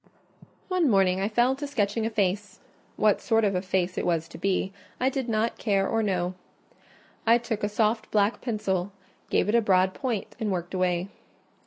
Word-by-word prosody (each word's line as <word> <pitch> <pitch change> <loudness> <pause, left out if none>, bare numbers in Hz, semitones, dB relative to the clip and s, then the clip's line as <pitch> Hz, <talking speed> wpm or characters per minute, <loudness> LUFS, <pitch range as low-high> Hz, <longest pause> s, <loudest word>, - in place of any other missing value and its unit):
One 365 -6 +2
morning 190 -3 +3
I 200 - 0
fell 240 +4 +2
to 285 +1 -5
sketching 225 -4 0
a - - -1
face: 205 -2 -1 0.4
what 210 -1 +3
sort 225 -1 +2
of 200 -2 +2
a 180 - 0
face 185 -1 -1
it - - -2
was 165 -2 0
to - - -10
be, 195 +1 0 0.3
I 255 - +3
did 265 -2 -3
not 225 +1 0
care 195 -3 +1
or 225 - +1
know. 185 -3 0 0.9
I 230 +1 +7
took 230 -3 -4
a 205 - +1
soft 215 +1 0
black 210 +1 +1
pencil, 205 -5 -1 0.4
gave - - +2
it 210 - +1
a 235 - +5
broad 185 -2 +3
point, 245 -7 -3
and 215 -2 -1
worked 175 -1 -3
away. 180 0 0
205 Hz, 190 wpm, -26 LUFS, 190-230 Hz, 0.9 s, I